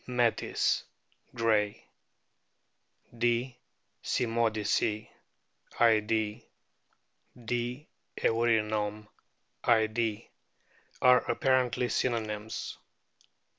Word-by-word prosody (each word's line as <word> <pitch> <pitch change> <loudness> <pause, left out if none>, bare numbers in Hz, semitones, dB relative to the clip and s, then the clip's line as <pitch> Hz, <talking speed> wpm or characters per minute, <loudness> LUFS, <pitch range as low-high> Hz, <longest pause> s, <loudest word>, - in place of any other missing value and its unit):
metis, 120 -2 +1 0.5
Gray; 110 -3 +1 1.3
D. 120 +2 0 0.5
cymodice, 110 -2 0 0.7
Id.,; 110 -2 +2 1.0
D. 120 +5 -3 0.3
eurynome. 110 -2 +1 0.6
Id., 110 -1 +1 0.8
are 125 0 +7
apparently 125 -2 +1
synonyms. 110 -4 -2
115 Hz, 50 wpm, -30 LUFS, 110-120 Hz, 1.3 s, are